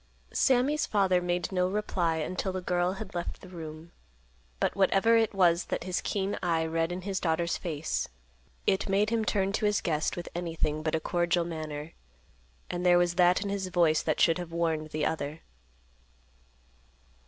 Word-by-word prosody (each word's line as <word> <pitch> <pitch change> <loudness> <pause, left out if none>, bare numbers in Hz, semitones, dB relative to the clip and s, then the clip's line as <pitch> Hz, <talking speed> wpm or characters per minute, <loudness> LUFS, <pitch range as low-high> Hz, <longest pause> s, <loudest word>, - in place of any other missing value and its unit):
Sammy's 270 +3 +2
father 190 -3 +2
made 175 0 -1
no 180 -1 +2
reply 185 -5 0
until 180 +4 -2
the 185 - -3
girl 180 0 0
had 205 +3 -8
left 175 -1 -4
the - - -12
room, 160 -1 -9 0.7
but - - 0
whatever 195 +3 +4
it 225 -2 +3
was 175 -2 +4
that - - -3
his 185 0 -2
keen 200 0 -2
eye 165 -3 +1
read 165 +1 0
in 180 +1 -4
his 195 -1 -2
daughter's 170 0 0
face, 160 -3 -3 0.6
it 190 0 +1
made 205 +3 +2
him 230 -1 +1
turn 195 -2 +1
to 210 +2 -1
his 210 0 +2
guest 155 -2 -1
with 175 - -5
anything 165 -3 -2
but 155 0 0
a - - +1
cordial 175 +1 +1
manner, 155 -2 -6 0.7
and 175 0 -3
there 175 -1 +6
was 175 -1 +2
that 180 +1 +4
in 200 - -3
his 200 -1 -2
voice 170 -3 +3
that 155 - -1
should 165 +1 +4
have 175 -2 -6
warned 165 -2 -1
the 155 -1 -1
other. 155 0 -3
175 Hz, 175 wpm, -29 LUFS, 165-190 Hz, 0.7 s, there